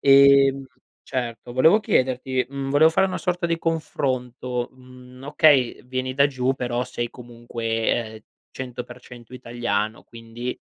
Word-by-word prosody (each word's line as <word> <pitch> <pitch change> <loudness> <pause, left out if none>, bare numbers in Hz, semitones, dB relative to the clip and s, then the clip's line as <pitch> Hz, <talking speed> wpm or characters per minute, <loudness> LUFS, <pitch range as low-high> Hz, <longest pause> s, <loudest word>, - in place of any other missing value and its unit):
Ehm, 140 0 +6 0.4
certo, 120 -2 -5
volevo 160 - +5
chiederti 130 - 0
mhmm, 135 0 -5
volevo 145 +3 +6
fare 165 +4 +2
una 185 - -4
sorta 180 -1 -2
di 165 -1 0
confronto, 130 -6 -2
mhmm, 125 0 -15
okay, 145 -4 +3
vieni 130 0 -3
da 140 +1 +5
giù 130 -2 -1
però 125 -1 -2
sei 120 -1 -4
comunque, 115 -2 -3 0.2
ehm, 110 - -11 0.3
100% 125 -1 -9
italiano, 115 -3 -3
quindi, 115 +2 -7
130 Hz, 130 wpm, -23 LUFS, 120-140 Hz, 0.4 s, Ehm